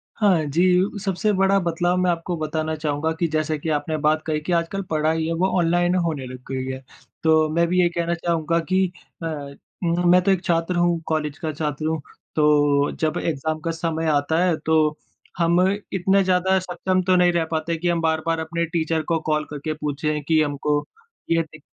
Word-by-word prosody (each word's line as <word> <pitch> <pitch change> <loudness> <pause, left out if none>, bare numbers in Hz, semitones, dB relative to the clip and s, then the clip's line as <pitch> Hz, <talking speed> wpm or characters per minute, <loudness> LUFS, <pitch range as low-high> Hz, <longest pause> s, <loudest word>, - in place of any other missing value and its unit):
हाँ, 190 -7 +3
जी। 180 +7 +2
सबसे 195 +2 0
बड़ा 195 0 +3
बदलाव 175 +1 0
मैं 180 - +2
आपको 170 +1 -3
बताना 155 0 -2
चाहूँगा 150 0 -1
कि 170 - +2
जैसा 155 0 0
कि 155 +2 -4
आपने 155 +1 -1
बात 155 +1 +3
कही 155 -1 -1
कि 170 - -4
आजकल 170 +4 0
पढ़ाई 160 +1 +1
है 165 - -1
वो 190 - +4
ऑनलाइन 175 +1 +2
होने 165 -7 -1
लग 130 0 -8
गई 130 -1 -2
है। 130 - -6 0.4
तो 160 -1 +4
मैं 170 0 +2
भी 180 +1 +2
ये 175 - +3
कहना 170 0 -1
चाहूँगा 170 -1 0
कि 190 0 +4 0.4
अ, 165 - -1 0.6
मैं 175 +1 +4
तो 195 - +2
1 185 -1 +1
छात्र 170 +1 0
हूँ 175 -1 +2
कॉलेज 150 -2 -1
का 160 - -2
छात्र 150 0 -3
हूँ। 160 0 -1 0.3
तो 145 -2 +3
जब 155 -1 0
एक्ज़ाम 155 0 -2
का 165 +1 -2
समय 165 0 -2
आता 155 +4 +2
है, 180 -3 +2
तो 155 -1 +1 0.4
हम 170 +1 +3 0.3
इतने 190 +1 +3
ज़्यादा 185 0 +2
सक्षम 185 +1 -1
तो 185 - +5
नहीं 180 -1 +4
रह 170 -1 +1
पाते 160 +1 -1
कि 175 +2 -2
हम 170 -1 +1
बार-बार 160 0 0
अपने 170 +1 -2
टीचर 160 -1 -1
को 165 - +2
कॉल 155 -1 0
करके 150 +1 -4
पूछे 150 0 -2
कि 160 -1 +4
हमको 145 0 0 0.5
ये 165 0 +3
दिक 155 -2 -14
165 Hz, 195 wpm, -22 LUFS, 155-175 Hz, 0.6 s, तो